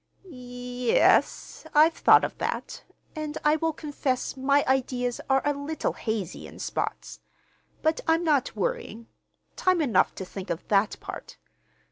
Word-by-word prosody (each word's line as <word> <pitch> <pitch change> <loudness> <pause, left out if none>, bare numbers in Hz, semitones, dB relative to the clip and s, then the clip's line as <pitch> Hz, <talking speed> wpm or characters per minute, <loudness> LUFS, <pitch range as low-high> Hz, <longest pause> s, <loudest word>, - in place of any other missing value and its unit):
"Y 380 - -15
yes, 250 +3 0
I've 315 +2 +6
thought - - +5
of - - -3
that, - - -4 0.3
and 305 -1 -4
I 300 +1 +4
will 325 +1 0
confess 290 -5 -3
my 275 +2 +2
ideas 250 -2 0
are 270 0 +3
a 290 - +2
little 285 +3 -3
hazy, 215 -6 -4
in - - -13
spots. - - -4 0.6
But 315 0 +1
I'm 325 +1 +3
not 295 -6 +1
worrying. 470 - -3 0.5
Time 370 -1 +2
enough 240 - +2
to 190 - -6
think 190 +1 -8
of 170 - -4
that 205 +1 +2
part. - - -8
270 Hz, 145 wpm, -26 LUFS, 245-315 Hz, 0.6 s, I've